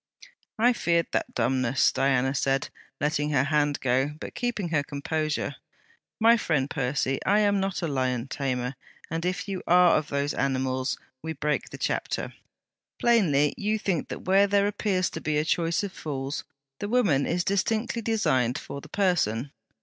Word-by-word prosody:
'I 240 +3 +4
feared 170 -7 +1
that - - -2
dumbness!' 125 +1 +2
Diana 135 -1 +1
said, 135 0 0 0.3
letting 150 0 0
her 140 -4 +3
hand 145 0 +1
go, 130 +3 +1
but - - -7
keeping 240 -7 -2
her 155 -3 +2
composure. 150 +2 -2 0.6
'My 230 +1 +6
friend 150 -10 0
Percy, 135 -1 -1
I 205 +2 +3
am 205 -1 +3
not 195 -2 -2
a - - +1
lion 130 -3 -1
tamer, 130 -2 -2 0.4
and 165 +1 -2
if 180 +1 -2
you 195 -2 -3
are 180 0 +6
of 155 - 0
those 140 +1 -1
animals, 130 -1 -1 0.2
we 160 +1 -4
break 150 0 -1
the - - -8
chapter. - - -2 0.7
Plainly 160 -12 +3
you 215 +1 0
think 190 -7 -1
that - - -7
where 195 +2 +5
there 200 0 +3
appears 200 -3 0
to - - -6
be 155 -1 0
a 150 - +1
choice 170 +3 +1
of 200 -2 -4
fools, 140 -5 -4 0.3
the 205 - -3
woman 190 - +2
is 175 +1 0
distinctly 220 +5 0
designed 130 - +1
for 140 - -7
the 155 - -13
person. 145 - 0
155 Hz, 165 wpm, -26 LUFS, 135-195 Hz, 0.7 s, My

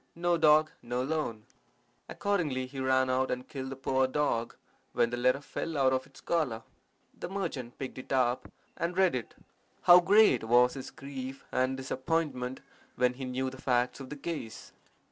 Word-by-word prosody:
No 175 0 +1
dog, 155 -1 +5
no 125 +1 -2
loan.' 130 -7 -2 0.6
Accordingly 160 -11 -1
he 135 +1 -8
ran 130 0 +2
out 130 +1 +1
and 125 0 -3
killed 130 -2 -6
the 135 - -5
poor 130 0 +1
dog, 130 -4 -1 0.4
when 115 - +2
the - - -1
letter 130 +3 +2
fell 160 +2 -4
out 130 -1 +3
of 130 0 -1
its 140 - -17
collar. 130 -10 -1 0.6
The - - -5
merchant 160 -11 -4
picked 130 -1 -6
it - - -11
up 125 -2 +1 0.2
and 175 +2 -3
read 190 -2 +4
it. 125 -3 -4 0.5
How 175 0 +9
great 200 - +5
was 120 +2 +4
his 135 -2 -7
grief 135 -1 -8
and 130 +1 +1
disappointment 130 -1 -2 0.3
when 125 0 +2
he 130 +1 -6
knew 130 +1 -2
the 130 - -11
facts 125 0 +1
of 135 -1 -8
the 150 - -7
case! 140 -7 -6
130 Hz, 175 wpm, -30 LUFS, 125-150 Hz, 0.6 s, How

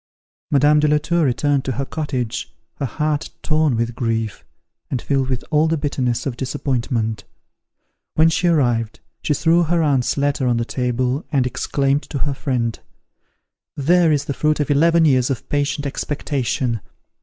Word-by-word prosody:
Madame 145 +1 +4
de 150 - +3
la 150 0 +4
Tour 170 +3 0
returned 140 +1 +1
to 130 - -2
her 135 +3 -2
cottage, 130 -5 -3 0.3
her 140 - -2
heart 150 +3 -2
torn 155 -4 +2
with 115 +1 -1
grief, 115 -2 -2 0.5
and 130 - -1
filled 135 +1 0
with 130 -2 -2
all 155 +1 +3
the 165 0 +1
bitterness 130 -5 -1
of 135 -4 -2
disappointment. 120 -5 -2 0.9
When 160 +1 +5
she 175 +2 +1
arrived, 120 -9 +1 0.2
she 150 - 0
threw 165 +4 +3
her 170 0 +1
aunt's 140 -4 +1
letter 140 -2 +1
on 120 -1 +2
the 115 - -1
table, 125 +3 -1
and 135 -4 +2
exclaimed 135 +3 0
to 145 - -3
her 140 +1 -1
friend, 125 -4 -2 1.0
"There 165 +3 +4
is 145 -1 +1
the 140 - -2
fruit 155 +2 +1
of 145 -1 0
eleven 165 +3 +4
years 130 -3 +3
of 130 -4 -3
patient 145 0 -1
expectation!" 135 -5 -2
140 Hz, 165 wpm, -20 LUFS, 125-150 Hz, 1.0 s, When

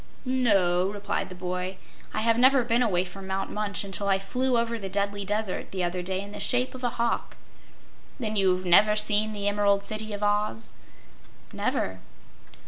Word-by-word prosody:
"No," 195 -8 +2
replied 205 -1 -3
the 185 - -9
boy, 180 +1 -4 0.3
"I 215 - -2
have 230 +1 +3
never 260 0 +6
been 235 +1 +1
away 185 -6 +2
from 190 +1 -9
Mount 190 0 -2
Munch 210 -1 -2
until 200 0 -2
I 195 -1 +4
flew 250 +6 0
over 230 0 -1
the 195 -2 -5
Deadly 200 +1 -1
Desert 210 -1 -2
the 185 -2 -3
other 175 +1 -1
day 190 +1 -2
in 200 0 -9
the - - -7
shape 250 +1 0
of 255 0 -9
a 245 - +2
hawk." 235 0 -2 0.8
"Then 215 -3 -2
you've 185 -2 +2
never 210 +4 +6
seen 215 0 +3
the 205 -1 -3
Emerald 205 -1 +2
City 215 +1 -3
of 205 0 -4
Oz?" 205 - 0 0.8
"Never." 95 0 -1
205 Hz, 180 wpm, -27 LUFS, 190-220 Hz, 0.8 s, never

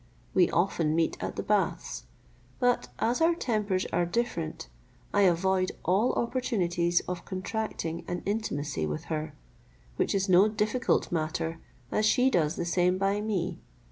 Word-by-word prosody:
We 180 - +4
often 165 -3 +1
meet 165 -1 +1
at - - -3
the - - -3
baths, - - -1 0.5
but 245 -1 +2
as 245 +6 0
our 335 +1 +4
tempers 210 - 0
are 175 - +3
different, 170 - -2 0.5
I 205 - +4
avoid 185 +2 +1
all 195 +7 +3
opportunities 180 -9 +1
of 180 -1 -5
contracting 185 -4 -4
an 175 0 -3
intimacy 145 - -2
with 75 0 -4
her, 155 0 -3 0.6
which - - +1
is 195 0 +1
no 185 +2 +6
difficult 215 +3 0
matter, 165 0 -2 0.3
as 215 - +2
she 255 +4 +4
does 160 -7 +2
the 170 - -2
same 180 +1 +2
by 195 +2 +1
me. 185 -5 -2
185 Hz, 145 wpm, -28 LUFS, 170-215 Hz, 0.6 s, no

